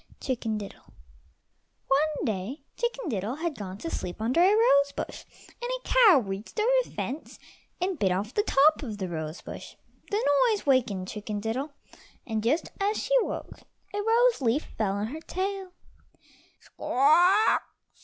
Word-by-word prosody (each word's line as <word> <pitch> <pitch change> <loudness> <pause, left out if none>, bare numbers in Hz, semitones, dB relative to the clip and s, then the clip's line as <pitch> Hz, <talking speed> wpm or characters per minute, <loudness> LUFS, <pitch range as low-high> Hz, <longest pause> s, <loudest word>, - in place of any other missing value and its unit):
CHICKEN 230 -4 -2
DIDDLE 205 -2 -8 1.1
One 300 +2 +1
day 220 - -3
Chicken 480 -2 -2
diddle 215 +1 -2
had 330 +1 -2
gone 195 -4 -7
to 330 - -5
sleep 175 +2 -5
under 235 +8 +1
a 370 +3 +6
rose 280 -11 +4
bush, - - -6 0.4
and 485 - -3
a - - -20
cow 455 -10 +7
reached 200 - -6
over 450 +4 +3
the - - -15
fence 285 +5 -5 0.4
and 365 -2 -1
bit 190 -2 +2
off 200 +6 -2
the 415 - +2
top 305 -5 +4
of 225 -7 -5
the 190 -2 -3
rose 160 -1 -5
bush. - - -9 0.3
The 415 -3 0 0.2
noise 425 -2 -1
wakened 240 -9 +1
Chicken 210 0 -5
diddle, 255 +8 -3 0.5
and 220 -2 -2
just 280 +9 0
as 410 +2 +1
she - - -2
woke - - -5 0.3
a 410 - -1
rose 460 - +3
leaf 255 +5 0
fell 205 -3 0
on 200 +1 -2
her 310 +5 -7
tail. 380 +1 -4
270 Hz, 155 wpm, -27 LUFS, -, 1.1 s, cow